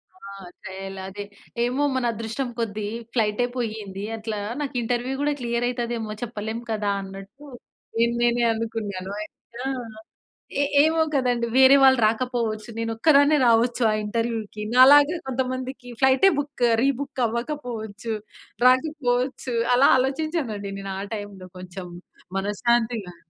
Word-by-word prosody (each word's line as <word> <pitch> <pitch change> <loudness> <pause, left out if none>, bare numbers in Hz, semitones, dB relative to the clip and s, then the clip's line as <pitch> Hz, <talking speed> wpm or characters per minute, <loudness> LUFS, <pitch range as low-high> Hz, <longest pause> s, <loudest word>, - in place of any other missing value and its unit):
ఆ! - - -22 0.5
తయాల 195 +1 -7
అదే. 205 +1 -6 0.4
ఏమో 250 +4 0
మన 260 -1 0
అదృష్టం 230 +4 -4
కొద్ది 210 -2 -2 0.3
ఫ్లైటె 220 0 +1
పోయింది. 215 -5 -4
అట్లా 220 -1 -4 0.2
నాకు 280 -3 -4
ఇంటర్వ్యూ 245 +2 -1
గూడా 295 0 +1
క్లియర్ 235 0 -1
అయితదేమో 235 -3 -3
చెప్పలేం 220 -1 -4
కదా! 210 -2 -1
అన్నట్టు 195 +8 -11 0.5
నేను 235 +1 +2
నేనే 240 0 +2
అనుకున్నాను. 215 -4 -4 0.5
ఆ! - - -1 0.9
ఎ - - +4 0.2
ఏమో 320 +1 +2
కదండీ! 245 -3 +1
వేరే 265 +1 +8
వాళ్ళు 260 -1 +6
రాకపోవచ్చు. 225 -2 -2
నేనొక్కదాన్నే 280 +6 +4
రావచ్చు 235 +2 +3
ఆ - - +1
ఇంటర్వ్యూకి. 220 -1 -3
నాలాగా 285 +5 +7
కొంతమందికి 255 0 -3
ఫ్లైటె 265 +9 +5
బుక్ 285 -3 -4 0.2
రీబుక్ 275 0 -1
అవ్వకపోవచ్చు. 235 -3 -4 0.5
రాకపోవచ్చు 255 -2 +1 0.2
అలా 270 +3 +6
ఆలోచించానండి. 265 - -2
నేనా 195 -1 -5 0.2
టైమ్‌లో 205 -3 -8
కొంచెం 180 0 -8 0.5
మనశ్శాంతిగా. 220 -1 0
235 Hz, 115 wpm, -24 LUFS, 215-260 Hz, 0.9 s, వేరే